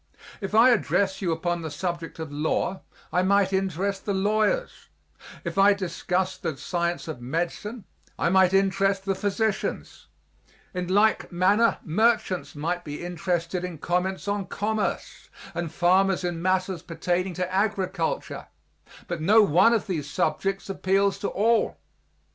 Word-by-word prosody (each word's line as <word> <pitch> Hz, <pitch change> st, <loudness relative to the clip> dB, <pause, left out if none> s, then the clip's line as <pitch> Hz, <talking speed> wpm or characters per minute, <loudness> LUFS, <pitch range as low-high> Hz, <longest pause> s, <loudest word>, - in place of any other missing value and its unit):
If 200 Hz, +1 st, -3 dB
I 235 Hz, +3 st, +7 dB
addrest 190 Hz, -, 0 dB
you 180 Hz, -3 st, 0 dB
upon 175 Hz, +1 st, -1 dB
the 160 Hz, -, -4 dB
subject 170 Hz, +2 st, -4 dB
of 160 Hz, -2 st, -6 dB
law 155 Hz, +5 st, -1 dB, 0.3 s
I 180 Hz, -, +3 dB
might 195 Hz, 0 st, +2 dB
interest 190 Hz, +1 st, -1 dB
the 200 Hz, -, -1 dB
lawyers; 215 Hz, -, 0 dB, 0.5 s
if -, -, -3 dB
I 200 Hz, +1 st, +6 dB
discust 185 Hz, -1 st, -2 dB
the 155 Hz, -, -3 dB
science 170 Hz, +3 st, -2 dB
of 155 Hz, -6 st, -6 dB
medicine 175 Hz, -, -3 dB, 0.3 s
I -, -, +1 dB
might 190 Hz, 0 st, +5 dB
interest 195 Hz, 0 st, +2 dB
the 195 Hz, -, +1 dB
physicians; 205 Hz, +1 st, -2 dB, 0.7 s
in 180 Hz, -1 st, -3 dB
like 205 Hz, +4 st, +2 dB
manner 200 Hz, +6 st, +3 dB
merchants 190 Hz, 0 st, +1 dB
might 170 Hz, +4 st, -2 dB
be 150 Hz, +2 st, -6 dB
interested 175 Hz, 0 st, -2 dB
in 180 Hz, -3 st, -5 dB
comments 180 Hz, +5 st, -1 dB
on 200 Hz, -1 st, -1 dB
commerce, 215 Hz, +1 st, -3 dB, 0.2 s
and 170 Hz, -2 st, -3 dB
farmers 185 Hz, +2 st, +3 dB
in 175 Hz, -2 st, -2 dB
matters 185 Hz, -1 st, 0 dB
pertaining 175 Hz, +2 st, -2 dB
to 185 Hz, 0 st, -3 dB
agriculture; 200 Hz, -, -1 dB, 0.6 s
but 170 Hz, -2 st, -4 dB
no 210 Hz, +7 st, +6 dB
one 190 Hz, +5 st, +5 dB
of 230 Hz, -3 st, +1 dB
these 160 Hz, -8 st, -3 dB
subjects 195 Hz, +7 st, -1 dB
appeals 195 Hz, 0 st, +1 dB
to 200 Hz, -, -2 dB
all. 225 Hz, +3 st, +1 dB
185 Hz, 140 wpm, -25 LUFS, 175-200 Hz, 0.7 s, I